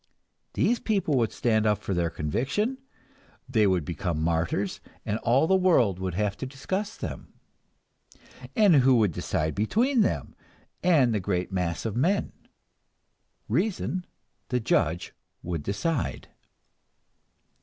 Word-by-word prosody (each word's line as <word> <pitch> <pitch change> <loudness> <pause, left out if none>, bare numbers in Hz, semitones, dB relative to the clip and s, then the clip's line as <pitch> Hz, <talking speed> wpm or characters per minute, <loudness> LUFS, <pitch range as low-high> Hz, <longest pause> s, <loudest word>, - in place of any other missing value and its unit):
These 235 +1 +2
people 195 -9 0
would 115 -5 +1
stand 110 -2 +1
up 105 -1 +3
for 95 - -4
their 85 -2 0
conviction, 135 - -1 0.7
they 110 -5 +3
would 90 -5 +1
become 85 -1 -3
martyrs, 85 +4 -1 0.2
and 105 +2 -1
all 130 +6 +3
the 190 - +3
world 130 - +3
would 95 -2 -3
have 105 0 0
to 130 - -5
discuss 190 +11 -4
them. - - -7 1.2
And 205 - +6
who 130 -1 +5
would 105 -5 +3
decide 80 0 -2
between 230 - +2
them - - -1 0.5
and 145 -10 +4
the 105 - +1
great 90 -1 -2
mass 90 -1 -2
of 110 - -2
men? 180 +11 +1 1.2
Reason, 180 - -1 0.5
the 125 - +1
judge, 85 -7 0 0.3
would 85 -3 -3
decide. 115 - -2
115 Hz, 130 wpm, -27 LUFS, -, 1.2 s, And